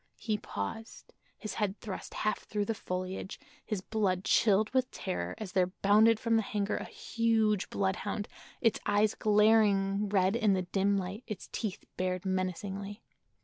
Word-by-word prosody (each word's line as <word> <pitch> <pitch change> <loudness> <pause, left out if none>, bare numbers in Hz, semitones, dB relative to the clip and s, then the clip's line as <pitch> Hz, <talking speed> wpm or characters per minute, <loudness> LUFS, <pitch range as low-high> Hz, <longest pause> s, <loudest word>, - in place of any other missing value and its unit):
He 220 -2 -1
paused, 220 - -6 0.2
his 215 - -5
head 205 -1 0
thrust 195 -4 -7
half 215 - 0
through 210 -1 -3
the 225 - -1
foliage, 185 -1 -5 0.2
his 210 -4 -3
blood 190 -3 0
chilled 210 0 +3
with 255 0 +1
terror 85 0 -4
as 210 -4 -6
there 185 -1 +3
bounded 210 +4 +4
from 230 0 +2
the - - +3
hangar 205 -1 -1
a - - -5
huge 220 -3 0
bloodhound, 200 +2 -1 0.3
its 230 -3 +3
eyes 205 +1 +3
glaring 210 -2 +3
red 195 0 +3
in 220 -4 +3
the 185 -1 0
dim 195 +2 +1
light, 195 +5 -4
its 215 - -6
teeth 215 -5 -4
bared 185 0 -1
menacingly. 190 +2 -3
205 Hz, 155 wpm, -31 LUFS, 190-215 Hz, 0.3 s, bounded